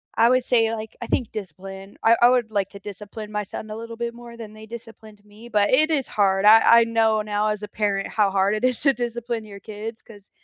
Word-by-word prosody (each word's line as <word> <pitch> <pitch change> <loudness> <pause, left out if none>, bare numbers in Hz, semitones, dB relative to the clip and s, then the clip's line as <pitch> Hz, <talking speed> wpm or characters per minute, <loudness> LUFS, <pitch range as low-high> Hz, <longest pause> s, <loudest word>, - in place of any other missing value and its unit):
I 230 - +4
would 255 0 +3
say, 230 -3 +2
like, 220 -1 -7
I - - -5
think 240 -4 -1
discipline. 195 0 -9
I 225 +1 +6
I 240 - +7
would 245 -3 +1
like 200 -2 -1
to 200 - -12
discipline 210 +2 -9
my 210 0 -2
son 215 +2 -8
a 215 - -6
little 230 +1 -8
bit 235 0 -4
more 235 0 -12
than 220 -2 -10
they 215 0 -12
disciplined 220 -2 -12
me, 210 +3 -15
but 205 -2 +2
it 310 +5 +4
is 280 -5 0
hard. 195 -1 +1
I 220 +1 +8 0.2
I - - +5
know 225 -1 +1
now 210 0 -1
as 210 -1 -3
a - - -5
parent 205 -2 -2
how 210 -2 +1
hard 195 +2 +1
it 215 - -5
is 255 -2 +1
to 275 -2 +4
discipline 240 -2 -4
your 200 -1 -11
kids 215 +2 -8
‘cause 205 -3 -16
215 Hz, 245 wpm, -23 LUFS, 205-230 Hz, 0.2 s, I